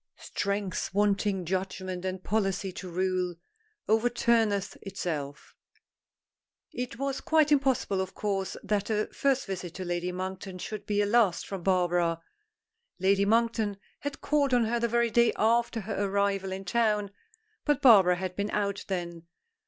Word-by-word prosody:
"Strength 200 -2 -3
wanting 200 -2 +1
judgment 185 0 -3
and 185 0 -4
policy 195 -2 0
to 185 0 -8
rule 180 0 -1 0.5
overturneth 225 -3 +2
itself." 155 -7 -5 1.2
It 245 -1 -5
was 275 +1 -2
quite 310 -2 +3
impossible, 265 -9 +2
of 190 0 -5
course, 195 -2 -2
that 205 0 -1
a 215 -1 0
first 270 -1 +1
visit 180 -3 -5
to 185 - -5
Lady 175 +1 -2
Monkton 185 +1 -5
should 205 +2 -6
be 205 0 +2
a - - +1
last 205 -5 +3
from 195 -2 -5
Barbara. 175 -2 +1 0.8
Lady 195 +1 +3
Monkton 225 -2 +1 0.2
had 285 0 -5
called 280 -3 +2
on 240 -2 +3
her 235 +2 0
the 235 - +1
very 235 0 +1
day 235 +1 +4
after 230 +1 +2
her 205 0 -2
arrival 200 -1 0
in 190 +1 -5
town, 210 -1 +1 0.5
but 295 -3 +2
Barbara 195 -8 +7
had 185 0 -4
been 200 +1 -2
out 200 -1 -1
then. 170 -3 -4
200 Hz, 145 wpm, -28 LUFS, 185-225 Hz, 1.2 s, Barbara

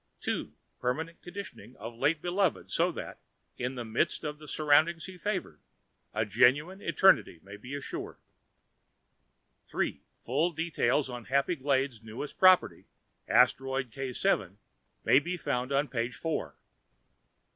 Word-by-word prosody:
"2. - - -2 0.3
PERMANENT 160 +7 -2
conditioning 175 - -9
of 115 +3 -8
late 145 +7 0
beloved 180 0 0
so - - +2
that, - - -7 0.4
in 125 +2 -3
the 120 -2 -5
midst 110 +7 0
of 150 0 -5
surroundings 155 +3 +3
he 190 - -9
favored, 180 - -3 0.5
a 110 - 0
genuine 135 - +3
Eternity 190 - +4
may 100 +1 -10
be 125 +7 -7
assured. 145 - -6 1.5
"3. - - -2 0.2
Full 155 +8 0
details 150 -4 +1
on 120 -3 -7
HAPPY 140 +6 +1
GLADES' 135 -3 0
newest 115 +6 -7
property, 185 -1 +5 0.4
Asteroid 135 -2 +3
K_, 125 - -1 0.5
may 135 - +6
be 175 +5 -4
found 130 -4 -2
on 140 +2 +2
page 120 -1 -2
4." 160 -2 -3
140 Hz, 125 wpm, -30 LUFS, 125-165 Hz, 1.5 s, may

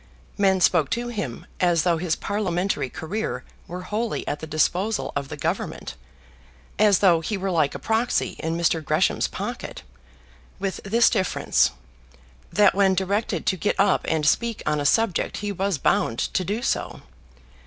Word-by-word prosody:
Men 195 -2 +3
spoke 165 -5 +4
to 240 0 -3
him, 195 - -5
as 175 -3 +3
though 175 -2 +2
his 165 -2 0
parliamentary 190 -7 -1
career 200 - -4 0.2
were 180 +1 -6
wholly 215 +5 -3
at 145 - -2
the 160 - -7
disposal 180 +7 0
of 140 -1 -2
the - - -6
Government, - - -3 0.9
as 205 -3 +5
though 170 -3 +5
he 200 +6 -2
were 190 0 -2
like 155 -5 +1
a - - -2
proxy 225 +2 0
in 165 +1 -2
Mr. 165 -1 +1
Gresham's 155 +6 +1
pocket, - - -6 0.7
with 195 -1 -3
this 230 +4 +4
difference, 190 - +2 0.8
that 205 +3 +5
when 195 -1 +3
directed 200 +4 -1
to 190 - +2
get 195 +3 -1
up 200 - +3
and 155 -2 0
speak 235 +7 +1
on 150 -1 +1
a 145 - +1
subject 225 +2 +1
he 205 0 -3
was 195 -2 -1
bound 115 -3 +1
to 185 - -1
do 210 +6 -3
so. - - -2
190 Hz, 165 wpm, -24 LUFS, 160-205 Hz, 0.9 s, as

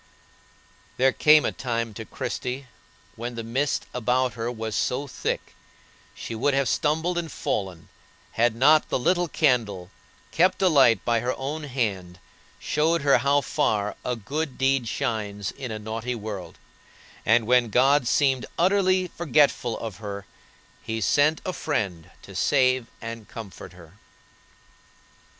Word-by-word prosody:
There 130 +1 +4
came 150 +1 +5
a - - +1
time 115 -3 -3
to 110 +2 -7
Christie 125 +6 -4 0.5
when 120 +1 -5
the 115 - -5
mist 130 +5 -1
about 125 +1 +1
her 115 0 -3
was 110 -2 -5
so 135 +3 0
thick 135 - -4 0.6
she - - -6
would 135 +5 +1
have 140 -1 +1
stumbled 160 +7 0
and 165 -3 -5
fallen 95 -5 -3 0.4
had 120 0 +2
not 150 +6 +4
the - - +1
little 175 +7 +1
candle, 110 - 0 0.4
kept 185 +3 +3
alight 135 - +4
by 120 -1 +2
her 125 +3 -2
own 150 +3 -4
hand, 100 -10 -3 0.4
showed 160 +1 0
her 140 -3 +5
how 140 +3 +3
far 110 -8 0
"a 125 - -1
good 135 +6 -4
deed 135 -2 +1
shines 105 -4 -3
in 135 -3 -7
a 110 - -4
naughty 110 +3 -4
world;" 105 -4 -7 0.7
and 115 0 +3
when 125 0 +3
God 135 +3 +3
seemed 135 -1 +2
utterly 185 0 +3
forgetful 145 -7 +1
of 110 -4 -6
her 100 -2 -6 0.6
He 110 0 -4
sent 145 +8 +2
a 185 - -2
friend 100 - -3
to - - -12
save 130 -3 +2 0.2
and 115 -1 -7
comfort 105 -5 -9
her. 90 +3 -16
125 Hz, 140 wpm, -25 LUFS, 110-145 Hz, 0.7 s, came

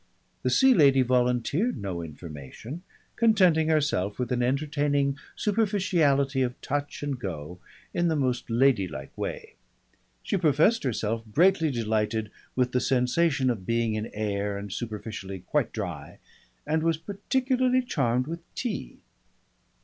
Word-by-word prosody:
The - - 0
Sea 265 -1 +5
Lady 135 - +5
volunteered 125 - +1
no 95 -5 -4
information, 80 - -8 0.3
contenting 185 -9 +4
herself 145 -11 +1
with 125 -1 -3
an 125 -1 +1
entertaining 140 +1 +1 0.2
superficiality 175 -11 +1
of 125 0 -1
touch 145 +1 -3
and 140 -3 -2
go, 90 -4 -6 0.3
in 175 0 +1
the 160 - +1
most 130 -5 -1
ladylike 105 - +1
way. - - -5 0.7
She - - 0
professed 170 +7 +3
herself 115 -2 -1
greatly 170 - +4
delighted 110 -3 -1 0.2
with 125 -1 +1
the 125 - +1
sensation 130 +2 +2
of 95 -6 -6
being 115 -1 +1
in 110 +1 -2
air 105 -1 -2
and 100 -1 -6
superficially 105 -4 -6
quite 90 - 0
dry, - - -6 0.5
and 155 +1 +1
was 165 -1 +1
particularly 255 - 0
charmed 125 - 0
with 165 +3 -5 0.2
tea. 240 -4 -4
130 Hz, 130 wpm, -27 LUFS, 110-160 Hz, 0.7 s, Sea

